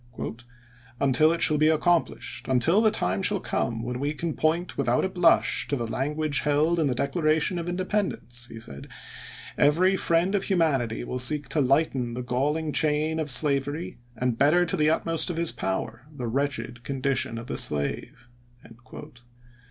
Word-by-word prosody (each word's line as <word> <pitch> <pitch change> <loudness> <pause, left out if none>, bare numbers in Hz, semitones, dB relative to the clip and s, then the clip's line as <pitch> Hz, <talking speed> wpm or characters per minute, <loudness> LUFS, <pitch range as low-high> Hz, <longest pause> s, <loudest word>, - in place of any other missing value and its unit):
" 120 0 -27
Until 140 +4 +4
it 170 - +1
shall 150 -1 +3
be 155 - +4
accomplished, 155 -7 0
until 145 - +3
the 220 - +4
time 95 - -1
shall - - +1
come 115 -1 -2
when 125 +1 -4
we 145 +3 -2
can 165 +1 -3
point 165 +4 -1
without - - +1
a - - -1
blush 175 -2 +2
to 145 - -1
the 120 -3 -3
language 145 +5 -1
held 150 +4 +1
in 155 - +2
the 130 - -1
Declaration 155 +5 0
of 170 +1 -4
Independence," 180 - -2
he 115 - -10
said, 70 -10 -10 0.7
"every 175 +7 +4
friend 170 +1 +1
of 200 - 0
humanity 140 - 0
will 125 +1 -4
seek 145 +4 +2
to 155 - +1
lighten 135 -3 +1
the 125 - -4
galling 150 +6 -1
chain 155 +1 +1
of 155 -2 -2
slavery 145 +4 0 0.2
and 120 0 -2
better 155 +6 +4
to 175 - -2
the 155 -3 +2
utmost 165 +1 -1
of 170 - -4
his 170 -1 +2
power 95 +7 -4
the 135 -5 -6
wretched 120 -2 -3
condition 135 -3 -1
of 115 - -7
the - - -5
slave." 75 +9 0
145 Hz, 170 wpm, -25 LUFS, 125-165 Hz, 0.7 s, Until